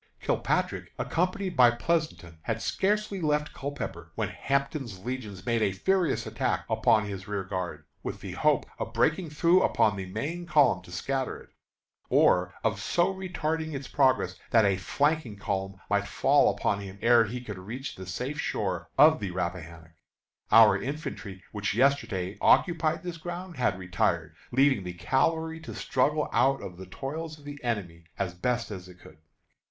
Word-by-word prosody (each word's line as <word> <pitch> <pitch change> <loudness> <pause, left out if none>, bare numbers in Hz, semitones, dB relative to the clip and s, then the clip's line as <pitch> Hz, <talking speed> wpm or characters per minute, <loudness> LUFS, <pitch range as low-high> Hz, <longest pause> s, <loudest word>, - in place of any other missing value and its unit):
Kilpatrick, - - -1
accompanied 185 +1 -1
by 125 -3 +7
Pleasonton, 120 - -2
had 115 +6 -2
scarcely 205 - 0
left 150 -1 0
Culpepper, 110 - -6
when - - -1
Hampton's 140 - -2
Legions 110 -7 -5
made 115 -2 +1
a 100 -2 +2
furious 170 - +1
attack - - -1
upon 110 -1 +3
his 95 -2 -6
rearguard, 95 -3 -4 0.2
with - - -5
the - - -7
hope - - +2
of - - -4
breaking 160 +2 +1
through 170 +5 +4
upon 105 -2 +3
the 95 -1 -5
main 155 - -4
column 145 - +4
to 90 - -14
scatter 130 +8 -2
it, - - -16 0.6
or 90 +1 +3
of 105 -2 0
so 175 - +1
retarding 160 -4 -3
its 135 -1 -5
progress 135 -3 +2 0.2
that 115 -3 +5
a 100 -1 +3
flanking 140 +3 0
column 95 -1 -3
might - - +1
fall - - +4
upon 100 - -1
him 100 -1 -8
ere 120 -1 +6
he 120 +4 -5
could 105 -6 -7
reach 120 +9 -6
the 95 -1 -9
safe 130 +10 -4
shore 90 - -2
of 155 +1 +7
the 100 - -3
Rappahannock. 85 -3 -5 0.6
Our 115 -2 +7
infantry, 125 -9 -6
which 105 -1 -2
yesterday 115 -8 +1
occupied 165 -2 +3
this 175 -2 -5
ground, 175 +1 -7
had 125 -7 +1
retired, 90 -3 -1 0.2
leaving 135 -4 +3
the 90 0 -5
cavalry 160 - 0
to 160 - -8
struggle 150 +4 +1
out 135 +1 +3
of 90 -2 -8
the 95 0 -9
toils 155 - -5
of 145 - -17
the 145 -1 -8
enemy 90 -9 -3
as 95 -3 -2
best 120 +6 -1
it 90 -2 -9
could. 80 - -16
120 Hz, 160 wpm, -28 LUFS, 95-155 Hz, 0.6 s, by